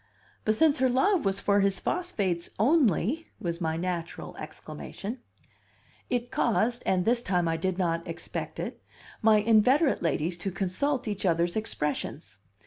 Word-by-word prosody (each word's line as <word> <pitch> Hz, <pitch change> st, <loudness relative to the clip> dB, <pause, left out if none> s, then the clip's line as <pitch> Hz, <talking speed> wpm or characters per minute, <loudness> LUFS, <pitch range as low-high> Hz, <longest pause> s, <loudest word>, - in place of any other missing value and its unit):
"But 215 Hz, -, +3 dB
since 305 Hz, +4 st, +3 dB
her 260 Hz, 0 st, +4 dB
love 310 Hz, -, +2 dB
was 195 Hz, 0 st, +1 dB
for 200 Hz, 0 st, +3 dB
his 195 Hz, -1 st, +2 dB
phosphates 200 Hz, -, -1 dB
only 270 Hz, -, +2 dB
!" -, -, -40 dB
was 170 Hz, 0 st, -3 dB
my 160 Hz, -1 st, 0 dB
natural 170 Hz, -1 st, -4 dB
exclamation. 225 Hz, +6 st, -7 dB, 0.9 s
It 245 Hz, -1 st, -1 dB
caused 240 Hz, +1 st, +1 dB
(and 185 Hz, -1 st, +2 dB
this 235 Hz, +1 st, +3 dB
time 180 Hz, -6 st, +1 dB
I 165 Hz, -, +1 dB
did 185 Hz, +2 st, -1 dB
not 170 Hz, -3 st, 0 dB
expect 165 Hz, -, -5 dB
it) -, -, -5 dB, 0.4 s
my 220 Hz, -1 st, +6 dB
inveterate 230 Hz, +8 st, +4 dB
ladies 165 Hz, +1 st, 0 dB
to 185 Hz, +3 st, -3 dB
consult 200 Hz, +9 st, -1 dB
each 205 Hz, -2 st, -3 dB
other's 170 Hz, -1 st, +1 dB
expressions. 150 Hz, -, -3 dB
200 Hz, 150 wpm, -28 LUFS, 175-245 Hz, 0.9 s, my